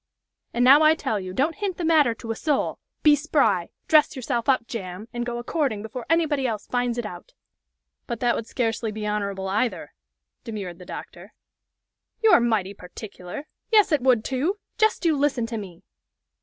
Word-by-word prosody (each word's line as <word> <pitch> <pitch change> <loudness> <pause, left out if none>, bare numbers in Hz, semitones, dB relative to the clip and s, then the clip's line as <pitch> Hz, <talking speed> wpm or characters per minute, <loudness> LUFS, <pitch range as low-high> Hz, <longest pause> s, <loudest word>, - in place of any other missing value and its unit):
And 245 +1 +2
now 275 +4 +8
I 310 +1 +6
tell 265 -9 -2
you, 185 -1 -6
don't 285 - 0
hint 400 -4 -2
the 345 - -2
matter 300 -8 +4
to 225 0 -6
a - - -2
soul. 295 +3 -1 0.2
Be 300 -1 +7
spry! 270 - +1 0.2
dress 305 -1 +5
yourself 245 -1 -2
up 255 -3 +3
jam! 195 -2 -6
and 240 0 -3
go 240 0 -3
a 240 - -5
courting 250 -7 -1
before 225 +2 -7
anybody 310 -5 +2
else 215 -3 -3
finds 245 -1 -1
it 240 - -2
out!" - - -9 0.7
"But 235 - -4
that 240 -1 +2
would 230 - -4
scarcely 225 -3 -1
be 215 0 -5
honorable 200 -2 -2
either," 195 -5 -1 0.5
demurred 195 -6 -6
the 180 - -11
doctor. - - -9 0.9
"You're 440 - +7
mighty 220 -5 0
particular! 195 +6 -9 0.2
Yes, 425 -4 +5
it 300 -4 +3
would, 245 -4 +3
too! 290 +10 0 0.2
Jest 435 -4 +2
you 320 -2 +4
listen 275 -4 +1
to 230 0 -4
me! 185 -5 -10
240 Hz, 185 wpm, -24 LUFS, 210-290 Hz, 0.9 s, now